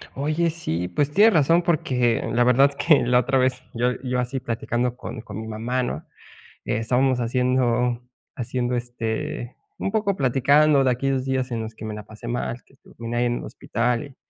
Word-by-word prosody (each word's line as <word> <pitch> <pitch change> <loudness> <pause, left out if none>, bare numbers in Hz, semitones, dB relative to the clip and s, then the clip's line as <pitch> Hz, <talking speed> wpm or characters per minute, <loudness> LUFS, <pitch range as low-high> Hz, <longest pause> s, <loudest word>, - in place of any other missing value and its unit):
Oye, 155 +4 0
sí, 90 - -3
pues, 145 +10 0
tienes 210 +6 +6
razón, 165 +3 +4
porque 125 -8 +1
la 120 +1 +4
verdad 125 +3 +5
que 155 -4 +5
la 125 +1 +3
otra 135 +1 +1
vez, 130 0 0
yo 125 +2 +1
yo 125 -1 -1
así 125 +2 -2
platicando 120 +1 -2
con 125 -2 -7
con 110 -2 -7
mi 110 - -7
mamá, 115 +4 -2
¿no? 120 -11 -4 0.6
Estábamos 125 +3 +1
haciendo 125 0 +1 0.3
haciendo, 125 0 -2
este, 120 +2 -4 0.2
un - - -2
poco 210 -2 0
platicando 140 +1 +4
de 130 - +3
aquellos 130 +1 0
días 130 -1 -1
en 115 -1 -2
los 110 0 -7
que 110 - -8
me 110 - -4
la 105 -1 -8
pasé 110 +2 -10
mal, 120 0 -3
que - - -26
estuve 140 - -21 0.2
ahí 120 +1 +2
en 120 0 0
el - - -7
hospital 120 0 -1
y 140 -2 -15
125 Hz, 190 wpm, -23 LUFS, 120-135 Hz, 0.6 s, tienes